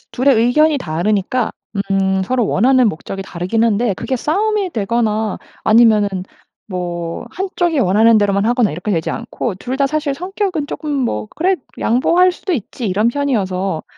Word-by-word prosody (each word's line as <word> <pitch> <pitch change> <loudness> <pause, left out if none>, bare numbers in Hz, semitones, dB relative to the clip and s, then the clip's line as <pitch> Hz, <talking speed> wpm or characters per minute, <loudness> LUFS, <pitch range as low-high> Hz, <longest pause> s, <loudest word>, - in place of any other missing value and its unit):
2 260 +3 0
의 270 - +6
의견이 285 +6 +3
다르니까 200 +6 -1 0.4
음 190 0 +1
서로 245 0 0
원하는 255 +3 +3
목적이 195 +2 -5
다르긴 185 +5 -2
한데 225 -1 +1
그게 260 +7 -3
싸움이 400 - 0
되거나 220 - -1 0.3
아니면은 215 -2 +5 0.6
뭐 175 -2 -4
1 385 +2 -3
쪽이 340 -4 +1
원하는 220 +2 +4
대로만 200 -1 +1
하거나 240 -4 +2
이렇게 180 +7 -4
되지 165 -4 0
않고 235 -1 -4
2 250 +6 -4
다 275 0 +2
사실 300 -1 -1
성격은 365 -1 -3
쪼끔 300 +1 -5
뭐 260 -6 -1
'그래 370 +3 +2 0.2
양보할 345 +10 +3
수도 370 +1 -4
있지.' 240 - -4
이런 205 +4 +1
편이어서 195 - -1
230 Hz, 330 characters per minute, -17 LUFS, 195-285 Hz, 0.6 s, 의